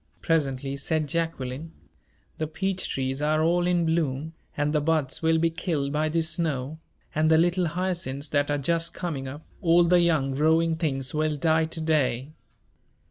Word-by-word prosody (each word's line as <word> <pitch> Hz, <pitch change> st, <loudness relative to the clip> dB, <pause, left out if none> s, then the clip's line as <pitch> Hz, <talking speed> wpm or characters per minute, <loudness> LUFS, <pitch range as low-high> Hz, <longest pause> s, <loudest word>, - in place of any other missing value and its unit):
presently 140 Hz, -4 st, 0 dB
said 155 Hz, +2 st, -1 dB
Jacqueline; 160 Hz, -2 st, -3 dB, 0.7 s
"the 155 Hz, -, -1 dB
peach 190 Hz, +4 st, -2 dB
trees 135 Hz, +1 st, -2 dB
are 155 Hz, +1 st, +2 dB
all 175 Hz, +2 st, +2 dB
in 175 Hz, -1 st, +2 dB
bloom, 160 Hz, -2 st, -1 dB, 0.2 s
and 145 Hz, +1 st, 0 dB
the 150 Hz, -, +2 dB
buds 150 Hz, -3 st, 0 dB
will 160 Hz, 0 st, +3 dB
be 165 Hz, +1 st, +2 dB
killed 160 Hz, -5 st, -2 dB
by 155 Hz, +1 st, +1 dB
this 165 Hz, 0 st, +1 dB
snow 155 Hz, -3 st, -2 dB, 0.3 s
and 155 Hz, +1 st, +2 dB
the 160 Hz, -, +6 dB
little 175 Hz, +2 st, +2 dB
hyacinths 170 Hz, -5 st, -2 dB
that 145 Hz, 0 st, 0 dB
are 145 Hz, -, +1 dB
just 165 Hz, +4 st, 0 dB
coming 150 Hz, -7 st, -4 dB
up 145 Hz, +4 st, -8 dB, 0.2 s
all 175 Hz, -1 st, +5 dB
the 175 Hz, +1 st, +4 dB
young 155 Hz, -6 st, +2 dB
growing 160 Hz, +3 st, +3 dB
things 135 Hz, -5 st, -2 dB
will 155 Hz, 0 st, 0 dB
die 160 Hz, +1 st, +2 dB
to 160 Hz, +1 st, -7 dB
day." 145 Hz, -4 st, 0 dB
160 Hz, 170 wpm, -26 LUFS, 145-165 Hz, 0.7 s, the